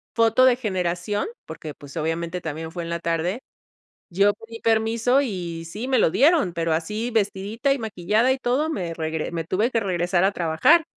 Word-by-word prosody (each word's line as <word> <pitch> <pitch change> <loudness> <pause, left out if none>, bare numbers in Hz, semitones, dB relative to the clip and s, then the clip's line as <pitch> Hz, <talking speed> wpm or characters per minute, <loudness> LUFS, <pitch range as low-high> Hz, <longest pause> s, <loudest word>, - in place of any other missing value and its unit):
foto 230 +2 +4
de 255 -1 +6
generación, 190 - -2 0.2
porque 155 -2 -7
pues, 140 -1 -13
obviamente 165 +2 -2
también 160 0 -5
fue 175 0 -5
en 165 - -6
la 170 0 -2
tarde, 170 +5 -1 0.7
yo 200 +3 +4
pedí 230 +2 -11
permiso 225 +3 +2
y 175 -9 -4
sí 210 +9 -6
me 265 -1 +2
lo - - +4
dieron, 290 - +4
pero 165 -1 0
así 210 +9 -2
vestidita 220 +4 0
y 275 - -4
maquillada 220 +3 +1
y 260 - +1
todo 265 +5 0
me 180 - -3
regre 160 -1 -3
me 165 -1 -3
tuve 210 +9 0
que 230 - +2
regresar 175 -3 0
a 195 - +3
trabajar, 170 - +4
195 Hz, 185 wpm, -23 LUFS, 170-230 Hz, 0.7 s, de